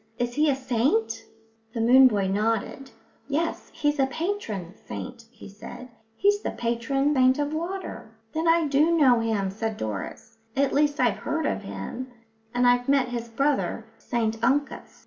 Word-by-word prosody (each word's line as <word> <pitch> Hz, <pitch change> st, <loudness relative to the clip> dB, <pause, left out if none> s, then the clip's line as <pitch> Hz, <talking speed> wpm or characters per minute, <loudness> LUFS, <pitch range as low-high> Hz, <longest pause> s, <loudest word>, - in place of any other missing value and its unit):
"Is 240 Hz, 0 st, -1 dB
he 300 Hz, +3 st, +3 dB
a 275 Hz, -, +3 dB
saint?" 230 Hz, -3 st, 0 dB, 0.5 s
The -, -, -2 dB
moon 255 Hz, +3 st, +7 dB
boy 205 Hz, -5 st, +1 dB
nodded. 225 Hz, +6 st, -1 dB, 0.4 s
"Yes, 315 Hz, +4 st, -2 dB
he's 295 Hz, 0 st, 0 dB
a 265 Hz, -, +4 dB
patron 265 Hz, -, -4 dB
saint," 235 Hz, +1 st, -8 dB
he 230 Hz, -1 st, -13 dB
said. 210 Hz, +5 st, -10 dB, 0.3 s
"He's 410 Hz, -, +2 dB
the -, -, -2 dB
patron 240 Hz, +5 st, 0 dB
saint 260 Hz, -1 st, +4 dB
of 290 Hz, +1 st, -1 dB
water." 345 Hz, -, -5 dB, 0.2 s
"Then 320 Hz, +1 st, -1 dB
I 330 Hz, -1 st, +4 dB
do 305 Hz, +4 st, +3 dB
know 255 Hz, -6 st, +5 dB
him," 215 Hz, -4 st, 0 dB
said 220 Hz, +2 st, -3 dB
Doris. 110 Hz, -, -6 dB, 0.2 s
"At 275 Hz, 0 st, +2 dB
least, 290 Hz, +1 st, +2 dB
I've 240 Hz, -6 st, +2 dB
heard 305 Hz, +9 st, -2 dB
of -, -, -1 dB
him, 100 Hz, -, -6 dB, 0.4 s
and 245 Hz, +1 st, +1 dB
I've 245 Hz, +1 st, +3 dB
met 275 Hz, -3 st, +3 dB
his 235 Hz, -1 st, -4 dB
brother, 275 Hz, +5 st, 0 dB
St 225 Hz, -2 st, -2 dB
Uncus." 275 Hz, +3 st, 0 dB
250 Hz, 165 wpm, -26 LUFS, 225-290 Hz, 0.5 s, moon